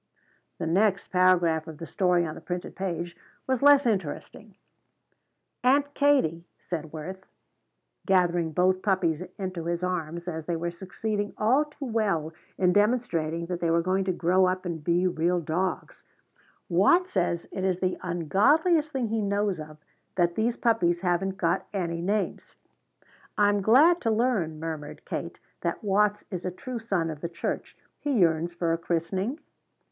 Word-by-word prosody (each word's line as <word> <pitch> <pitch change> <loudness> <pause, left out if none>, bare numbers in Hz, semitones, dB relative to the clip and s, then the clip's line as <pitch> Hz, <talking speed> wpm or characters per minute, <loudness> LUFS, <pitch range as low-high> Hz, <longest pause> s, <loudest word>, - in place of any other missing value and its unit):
The 170 - -3
next 195 +4 +1
paragraph 175 -3 +3
of 160 -2 -8
the 165 - -7
story 180 -1 +1
on 155 - -4
the - - -10
printed 180 0 -5
page 175 -3 -4 0.3
was 260 -2 0
less 285 -1 +6
interesting. 200 0 -3 1.1
"Aunt 285 +3 +3
Kate," 270 - +2
said 160 -3 -5
Worth, 185 +5 -8 0.8
gathering 175 -3 +2
both 185 +3 +2
puppies 180 -6 +1 0.2
into 185 -4 -4
his 170 +1 -2
arms 170 -1 -3
as 160 -3 -5
they 170 - 0
were 170 +1 -2
succeeding 205 +3 -4
all 255 +8 +3
too 295 -1 -9
well 200 - 0 0.2
in 180 -1 +3
demonstrating 180 -7 +1
that 175 0 -4
they 170 - 0
were 165 0 +2
going 190 +2 +1
to 190 - +1
grow 180 +2 +3
up 185 +1 -2
and 165 -3 -4
be 175 +3 +2
real 175 +1 +1
dogs, 175 +4 -3 0.6
"Watts 210 - +3
says 175 -2 0
it 190 - -4
is 185 -1 0
the 185 -1 -1
ungodliest 285 - +2
thing 255 -5 -2
he 225 0 0
knows 200 -2 0
of 155 0 -9 0.4
that 175 -2 +2
these 225 +5 0
puppies 175 -8 +2
haven't 190 +1 0
got 170 -3 0
any 170 -4 -2
names." 200 +3 -2 0.8
"I 205 -1 +5
am 205 0 +1
glad 295 - +5
to 230 - 0
learn," 215 -9 0
murmured 155 -2 -6
Kate, - - -5 0.2
"that - - -2
Watts 210 +1 +2
is 180 -2 -4
a 185 - -1
true 245 +7 -6
son 195 -8 -1
of 150 -2 -9
the 170 - -3
church. 170 - -4 0.2
He 290 - -1
yearns 170 -2 +2
for 170 -1 0
a 165 - -1
christening?" 185 - -2
185 Hz, 160 wpm, -27 LUFS, 170-210 Hz, 1.1 s, less